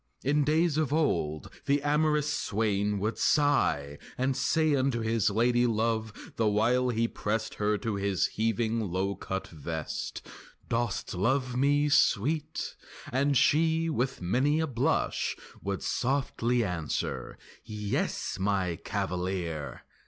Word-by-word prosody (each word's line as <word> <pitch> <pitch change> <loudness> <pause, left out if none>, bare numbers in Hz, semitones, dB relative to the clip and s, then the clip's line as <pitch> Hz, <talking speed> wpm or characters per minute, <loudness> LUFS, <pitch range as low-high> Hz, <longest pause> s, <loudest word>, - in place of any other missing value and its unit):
In 145 +2 +2
days 155 +1 +2
of 150 -4 0
old 80 - 0 0.2
the 140 +1 +3
amorous 150 0 +2
swain 105 -7 0
would 105 +3 -2
sigh 75 - +2 0.2
And 130 +1 +1
say 155 +1 +2
unto 130 -3 +1
his 110 -2 +1
lady 120 +3 +3
love 110 -1 -2
the 115 - +2
while 120 +5 +2
He 115 -1 +1
pressed 110 0 -2
her 105 0 0
to 110 -1 -2
his 100 -2 +1
heaving 115 +1 0
low 95 +3 -1
cut 95 -1 -5
vest, 80 0 -5 0.4
"Dost 115 -2 -1
love 125 +7 0
me, 145 +3 +3
sweet?" 145 +2 +1 0.4
And 140 +2 +2
she, 160 +3 +3
with 130 - -2
many 130 - +2
a 160 - +2
blush, 140 +2 0 0.2
Would 100 -1 -3
softly 125 -2 0
answer, 90 -6 -3 0.3
"Yes, 105 -3 -2
my 95 -3 0
cavalier!" 90 -4 -3
115 Hz, 125 wpm, -29 LUFS, 100-140 Hz, 0.4 s, the